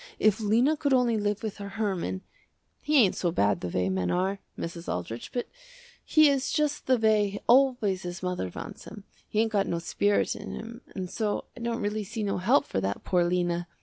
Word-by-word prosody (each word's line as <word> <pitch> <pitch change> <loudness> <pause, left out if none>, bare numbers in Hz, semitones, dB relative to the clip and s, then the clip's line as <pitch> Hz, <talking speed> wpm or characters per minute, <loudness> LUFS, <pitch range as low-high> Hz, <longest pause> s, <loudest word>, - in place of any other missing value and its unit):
If 215 0 +3
Lena 235 +8 +3
could 285 -2 0
only 245 -2 +3
live 205 0 -1
with 215 -2 -4
her 200 -1 -6
Herman, 190 -3 -2 0.6
he 300 0 +2
ain't 210 -8 +5
so 175 - 0
bad 100 - +1
the 90 - -3
way 90 +1 0
men 95 -1 0
are, 190 +2 0 0.2
Mrs. 170 0 -5
Aldrich, 110 +7 -5
but 245 - -3 0.6
he 310 -2 +5
is 275 -2 +1
just 300 -2 0
the 260 -1 +4
way 210 -2 +2
always 245 -7 +4
his 180 +1 -6
mother 180 - -2
wants - - -8
him, 210 -1 -10 0.3
he 215 - +2
ain't 225 -1 0
got 200 -2 +1
no 170 - -1
spirit 205 +4 +1
in 210 -1 -7
him, 230 +2 -8
and 185 -2 -3
so 210 +2 -2
I - - -10
don't 235 -1 -2
really 210 +1 -1
see 220 +2 -4
no 195 -2 -1
help 235 +10 +3
for 95 - -2
that 100 +1 -2
poor 180 -2 +2
Lena. 175 0 0
205 Hz, 210 wpm, -28 LUFS, 180-235 Hz, 0.6 s, ain't